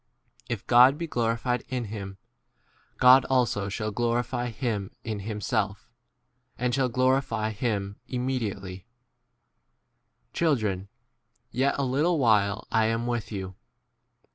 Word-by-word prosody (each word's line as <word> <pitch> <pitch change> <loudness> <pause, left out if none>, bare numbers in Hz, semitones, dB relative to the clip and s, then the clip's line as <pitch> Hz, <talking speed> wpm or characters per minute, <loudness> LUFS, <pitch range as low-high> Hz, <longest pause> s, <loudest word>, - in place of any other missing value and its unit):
If - - -4
God 125 +4 +6
be 170 - -3
p 160 - -13
glorified 120 +1 0
in 125 -3 -2
him, 100 -2 -6 0.8
God 130 +1 +7
also 115 -6 +1
shall 110 +1 -3
glorify 120 +2 -1
him 110 -4 -3
in 110 -3 -4
himself, 105 0 -3 0.7
and 125 0 -1
shall 130 0 +1
glorify 130 -3 +1
him 100 -3 -2
im 125 -1 -3
33 - - -2
mediately. 100 -8 -3 1.5
Children, 110 - 0 0.6
yet 135 +3 +1
a 140 - 0
little 150 +7 +1
while 105 -6 +2
I 110 -1 +3
am 115 +1 0
with 120 -2 -2
you. 95 -2 -5
115 Hz, 125 wpm, -27 LUFS, 105-125 Hz, 1.5 s, God